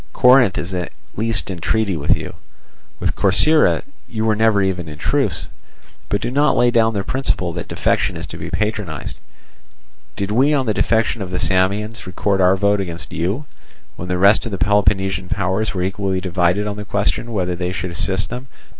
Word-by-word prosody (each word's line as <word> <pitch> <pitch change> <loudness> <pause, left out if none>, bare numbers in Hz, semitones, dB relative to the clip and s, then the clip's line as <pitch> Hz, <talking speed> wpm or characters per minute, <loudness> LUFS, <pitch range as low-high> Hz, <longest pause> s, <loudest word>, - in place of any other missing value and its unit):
Corinth 125 -5 +5
is 90 +2 -4
at 90 -2 -3 0.2
least 110 -2 0
in 90 - -6
treaty 105 +2 0
with 75 -2 +1
you; - - -7 0.7
with - - -1
Corcyra 155 0 +3 0.3
you 110 -1 -2
were 110 -1 +2
never 110 -1 +3
even 90 -3 -2
in 75 - -9
truce. - - 0 0.6
But 100 - 0
do - - -2
not 145 +3 +2
lay 120 0 +4
down 115 -2 +2
the 100 - -1
principle 95 -10 -1
that 85 - -6
defection - - 0
is - - -5
to - - -9
be - - -6
patronized. 95 - -3 1.0
Did 100 +1 -2
we 135 +7 +3
on 135 -2 0
the 110 - +1
defection 110 +1 +1
of 95 - -4
the 90 - -3
Samians 100 +4 0
record 95 +2 0
our 90 +1 +5
vote 100 +1 +2
against 85 -5 -6
you, 95 - -2 0.5
when 90 - -7
the 90 0 -1
rest 100 +3 +5
of - - -6
the 100 - -3
Peloponnesian 95 -3 +1
powers 100 +2 -1
were 90 - -1
equally 95 0 -1
divided 90 +2 +1
on 105 0 -4
the 105 - -5
question 100 +3 -1
whether 90 -4 -1
they 90 +1 -3
should 90 0 -4
assist 95 +2 -1
them? 125 +2 -6
100 Hz, 190 wpm, -19 LUFS, 90-110 Hz, 1.0 s, Corinth